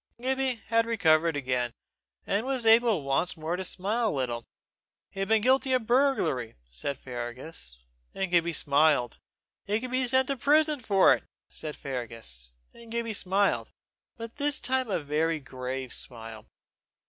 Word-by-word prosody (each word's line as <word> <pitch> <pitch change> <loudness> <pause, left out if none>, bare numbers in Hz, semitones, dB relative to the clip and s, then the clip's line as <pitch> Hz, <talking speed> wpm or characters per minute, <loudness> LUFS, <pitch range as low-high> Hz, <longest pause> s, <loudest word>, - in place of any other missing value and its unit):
Gibbie 260 -2 -1
had 230 0 +3
recovered 165 -7 +3
again, 125 -3 -1 0.5
and 200 +3 0
was 260 -3 -1
able 225 -6 +5
once 140 +7 0
more 160 +2 -2
to 190 - -4
smile 210 +6 -1
a - - +2
little. 120 - -2 0.6
He - - -9
had 195 +1 -1
been 220 -1 +3
guilty 260 +1 +3
of 250 -3 +1
burglary, 235 - +1
said - - -4
Fergus; 120 - -7 0.3
and 190 -2 -3
Gibbie 170 -1 +3
smiled. 145 -5 +2 0.4
He 210 +2 0
could 250 +1 -6
be 255 0 +1
sent 260 +1 +2
to 275 - -1
prison 300 +3 +3
for 200 -5 +5
it, - - -3 0.3
said 155 -1 -5
Fergus; 115 - -6 0.2
and 230 -1 -14
Gibbie 230 -1 -2
smiled 195 0 +1 0.5
but 230 +2 -8
this 290 0 0
time 260 -1 0
a 195 - 0
very 155 +2 0
grave 130 -1 -5
smile. 115 -3 -6
185 Hz, 155 wpm, -28 LUFS, -, 0.6 s, able